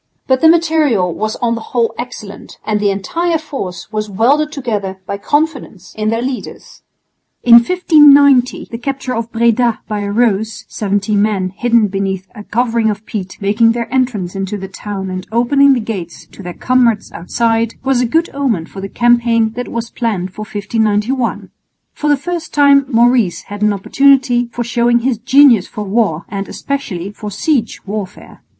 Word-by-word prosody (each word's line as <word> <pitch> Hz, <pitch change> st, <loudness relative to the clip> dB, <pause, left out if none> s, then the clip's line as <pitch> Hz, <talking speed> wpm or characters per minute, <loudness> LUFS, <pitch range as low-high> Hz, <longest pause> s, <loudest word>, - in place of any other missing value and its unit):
But 260 Hz, -1 st, +1 dB
the 320 Hz, -, +6 dB
material 310 Hz, -, +2 dB
was 215 Hz, +5 st, -3 dB
on 235 Hz, -1 st, +2 dB
the 230 Hz, -, -4 dB
whole 235 Hz, 0 st, -1 dB
excellent, 215 Hz, -4 st, -9 dB
and 210 Hz, -1 st, 0 dB
the 205 Hz, -1 st, +1 dB
entire 330 Hz, -, -1 dB
force 225 Hz, -, -7 dB
was 215 Hz, -1 st, -3 dB
welded 275 Hz, +10 st, +2 dB
together 210 Hz, -9 st, -3 dB
by 200 Hz, +1 st, -5 dB
confidence 290 Hz, -, -2 dB
in 215 Hz, 0 st, -1 dB
their 230 Hz, +2 st, -1 dB
leaders. 255 Hz, -1 st, -7 dB, 0.6 s
In 235 Hz, -1 st, +8 dB
1590 285 Hz, -3 st, +4 dB
the 230 Hz, -, -5 dB
capture 265 Hz, 0 st, -4 dB
of 230 Hz, 0 st, -4 dB
Breda 235 Hz, 0 st, +1 dB
by 210 Hz, -1 st, -3 dB
a 200 Hz, 0 st, -3 dB
ruse 220 Hz, -1 st, 0 dB
(seventy 205 Hz, 0 st, -1 dB
men 200 Hz, -2 st, +1 dB
hidden 235 Hz, -1 st, +2 dB
beneath 195 Hz, -1 st, -3 dB
a 210 Hz, -3 st, -10 dB
covering 230 Hz, 0 st, 0 dB
of 210 Hz, 0 st, -4 dB
peat 190 Hz, -5 st, -6 dB
making 220 Hz, +3 st, +3 dB
their 235 Hz, +1 st, -4 dB
entrance 245 Hz, -9 st, -1 dB
into 195 Hz, +1 st, -3 dB
the 190 Hz, -1 st, -7 dB
town 190 Hz, 0 st, -6 dB
and 185 Hz, 0 st, -6 dB
opening 275 Hz, +4 st, +4 dB
the 255 Hz, -, 0 dB
gates 195 Hz, -7 st, -6 dB
to -, -, -12 dB
their 180 Hz, -2 st, -7 dB
comrades 245 Hz, -4 st, +1 dB
outside) 225 Hz, +6 st, -1 dB
was 265 Hz, -2 st, +1 dB
a 245 Hz, -, +1 dB
good 325 Hz, +7 st, +1 dB
omen 250 Hz, -12 st, -1 dB
for 195 Hz, -, -10 dB
the 195 Hz, -, -6 dB
campaign 235 Hz, -1 st, +2 dB
that 245 Hz, +2 st, -5 dB
was 230 Hz, 0 st, -5 dB
planned 195 Hz, -6 st, -3 dB
for 215 Hz, -, -8 dB
1591. 215 Hz, +4 st, -1 dB, 0.4 s
For 300 Hz, -, -2 dB
the 290 Hz, -, +4 dB
first 335 Hz, +2 st, -5 dB
time 280 Hz, -1 st, +5 dB
Maurice 235 Hz, -6 st, +2 dB
had 205 Hz, 0 st, -9 dB
an 210 Hz, 0 st, +3 dB
opportunity 250 Hz, +3 st, +2 dB
for 240 Hz, -, -3 dB
showing 240 Hz, 0 st, +1 dB
his 245 Hz, -2 st, -1 dB
genius 245 Hz, -4 st, +5 dB
for 210 Hz, -, -6 dB
war 195 Hz, -5 st, 0 dB
and 195 Hz, 0 st, -5 dB
especially 200 Hz, -10 st, -4 dB
for 210 Hz, 0 st, -7 dB
siege 230 Hz, +3 st, -1 dB
warfare. 200 Hz, -1 st, -7 dB
230 Hz, 170 wpm, -15 LUFS, 205-255 Hz, 0.6 s, In